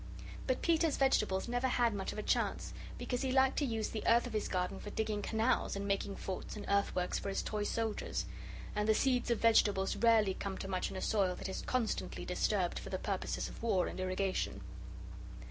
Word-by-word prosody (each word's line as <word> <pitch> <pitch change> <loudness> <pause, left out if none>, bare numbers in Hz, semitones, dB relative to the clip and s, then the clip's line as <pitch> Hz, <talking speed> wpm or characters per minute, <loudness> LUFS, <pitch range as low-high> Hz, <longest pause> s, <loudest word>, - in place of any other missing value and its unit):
But 255 - 0
Peter's 325 -2 +3
vegetables 215 -8 +2
never 245 +2 +1
had 240 -3 +2
much 195 -2 -3
of - - -8
a 210 - -3
chance, - - 0 0.2
because 250 -1 -2
he 265 - 0
liked 265 0 +4
to 290 - +1
use 225 -4 -1
the 220 - -4
earth 235 +2 +5
of 245 - -6
his 215 - 0
garden 180 -1 -1
for 205 - -7
digging 215 0 -1
canals, 225 +2 +1
and 200 0 -3
making 200 0 -1
forts 190 - -5
and 210 - -6
earthworks 200 -3 +1
for - - -4
his 195 - -1
toy 210 -1 -2
soldiers. 225 0 -2 0.5
And 210 +1 0
the 220 - +5
seeds 250 -1 +2
of 235 - +3
vegetables 205 -4 +3
rarely 225 -4 +4
come 195 0 -4
to - - -5
much 185 -1 -1
in 190 - -6
a - - -4
soil 195 -4 +1
that - - -5
is 190 - -4
constantly 250 -4 -2
disturbed - - 0
for - - -8
the - - -2
purposes - - -2
of - - -10
war 210 -6 +2
and - - -5
irrigation. 185 +1 -1
215 Hz, 210 wpm, -34 LUFS, 195-240 Hz, 0.5 s, earth